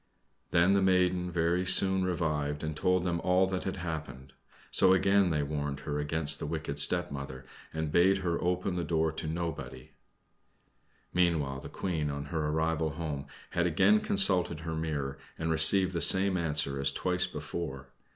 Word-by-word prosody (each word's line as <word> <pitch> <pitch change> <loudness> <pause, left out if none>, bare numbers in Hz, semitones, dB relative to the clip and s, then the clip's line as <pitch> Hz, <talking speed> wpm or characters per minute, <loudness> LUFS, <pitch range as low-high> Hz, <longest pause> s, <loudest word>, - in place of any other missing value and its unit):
Then 85 +3 +2
the 100 - +2
maiden 90 -1 +1
very 85 +1 -1
soon 95 +1 +3
revived 75 -5 -3
and 80 -1 -4
told 90 +3 0
them 85 -2 -2
all 90 +1 +2
that 95 -1 -4
had 95 - -3
happened. 75 -7 -7 0.4
So 95 0 +4
again 95 0 +2
they 75 -3 -1
warned 75 -1 -5
her 75 0 -4
against 75 +1 -1
the - - -5
wicked 75 -2 -5
stepmother, 70 -4 +4 0.3
and 80 -1 -4
bade 95 +4 +3
her 85 -1 -2
open 90 +1 -2
the 85 - -2
door 80 0 -1
to 80 0 -7
nobody. 85 +1 -6 1.2
Meanwhile 80 -7 0
the - - -10
Queen, 80 -5 -4
on 70 0 -5
her 80 -2 -2
arrival 80 0 -2
home, 75 -4 -6 0.2
had 85 0 0
again 95 +6 +3
consulted 95 -5 +2
her 80 0 -6
mirror, 75 -4 -4 0.2
and 80 0 -3
received 90 +4 +7
the 85 - -3
same 95 0 +4
answer 75 -5 0
as 70 0 +2
twice 90 +4 -1
before. 75 -4 -7
80 Hz, 165 wpm, -29 LUFS, 75-90 Hz, 1.2 s, received